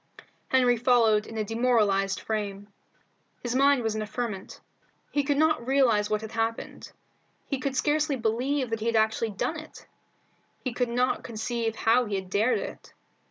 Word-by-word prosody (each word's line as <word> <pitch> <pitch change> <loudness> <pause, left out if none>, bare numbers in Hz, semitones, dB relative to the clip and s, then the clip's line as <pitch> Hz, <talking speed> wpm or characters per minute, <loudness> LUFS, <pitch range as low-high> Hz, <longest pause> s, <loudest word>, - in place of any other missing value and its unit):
Henry 250 -2 +3
followed 230 -3 +3
in 225 - -8
a 215 - 0
demoralized 210 -4 +1
frame. 205 -2 -4 0.7
His 240 -1 -2
mind 275 -1 +4
was 220 -1 0
in 215 - -3
a 215 - -4
ferment. 215 -4 -5 0.5
He 290 - +1
could 280 0 0
not 310 -5 +2
realize 240 -6 +3
what 215 0 0
had 220 -1 -7
happened. 225 0 -3 0.5
He 275 - -3
could 270 +1 -2
scarcely 295 +1 +1
believe 250 +3 -1
that 225 - -1
he 220 - -3
had 230 - +1
actually 220 +1 +2
done 310 +10 -3
it. 310 - -13 0.8
He 255 - -2
could 245 0 0
not 250 +2 0
conceive 225 0 -3
how 235 +3 +3
he 210 -2 -3
had 190 -1 -5
dared 220 +5 +2
it. - - -8
230 Hz, 170 wpm, -27 LUFS, 215-255 Hz, 0.8 s, mind